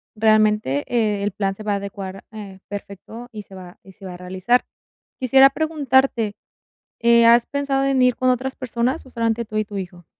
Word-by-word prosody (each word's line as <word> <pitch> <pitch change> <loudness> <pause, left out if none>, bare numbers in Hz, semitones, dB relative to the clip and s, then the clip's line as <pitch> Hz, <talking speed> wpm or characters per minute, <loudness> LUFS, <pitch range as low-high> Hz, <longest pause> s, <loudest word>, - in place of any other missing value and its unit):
realmente, 215 -9 +2
eh, 215 -4 0
el 205 - -1
plan 195 0 -2
se 215 - -10
va 210 -1 -1
a - - +1
adecuar, 195 -1 -7
eh, 200 -3 -10
perfecto 205 +4 -9
y 215 -3 -8
se 195 - -15
va 180 -1 -12
y 190 - -15
se 195 - -14
va 185 - -7
a - - -9
realizar. 185 +7 0 0.5
Quisiera 265 +2 +6
preguntarte, 270 -7 +1 0.7
eh, 235 0 +5
¿has 235 0 +6
pensado 280 -1 -1
en 275 -1 +1
ir 250 -1 +3
con 255 0 +2
otras 260 +1 -2
personas, 255 +3 -2
o - - -14
solamente 230 -1 -1
tú 215 -1 -8
y 215 - +1
tu 205 -1 -9
hijo? 175 -2 -8
220 Hz, 200 wpm, -21 LUFS, 200-250 Hz, 0.7 s, Quisiera